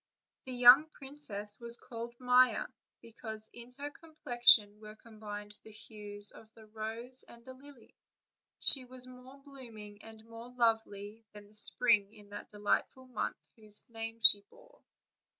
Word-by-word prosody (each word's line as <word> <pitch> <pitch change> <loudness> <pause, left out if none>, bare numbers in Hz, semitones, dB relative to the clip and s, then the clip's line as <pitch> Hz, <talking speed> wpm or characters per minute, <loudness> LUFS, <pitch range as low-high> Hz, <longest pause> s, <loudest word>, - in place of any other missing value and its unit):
The 260 - -7
young 250 +5 +7
princess 265 -9 -2
was 235 0 0
called 235 0 -9
Maia, 250 0 +3 0.4
because 220 -1 -10
in 240 +1 -14
her 290 +1 -6
com 320 +1 -19
plexion 220 -4 +5
were 215 0 -12
combined 210 -2 -8
the - - -15
hues 210 -1 -3
of 220 0 -16
the 220 - -16
rose 225 +4 -6
and 235 0 -17
the 260 - -10
lily; 265 -2 -18 0.6
and - - -20
she 265 - +7
was 255 0 -3
more 255 +2 -14
blooming 230 -7 -13
and 220 0 -14
more 230 +1 -12
lovely 225 -3 -2
than 205 -1 -14
the 215 - -24
spring 215 -1 +2
in 205 -1 -17
that 205 0 -10
delightful 210 +5 -2
month 240 - -4 0.2
whose 215 0 -2
name 225 0 -7
she 205 - +8
bore. - - -22
230 Hz, 155 wpm, -32 LUFS, 210-250 Hz, 0.6 s, she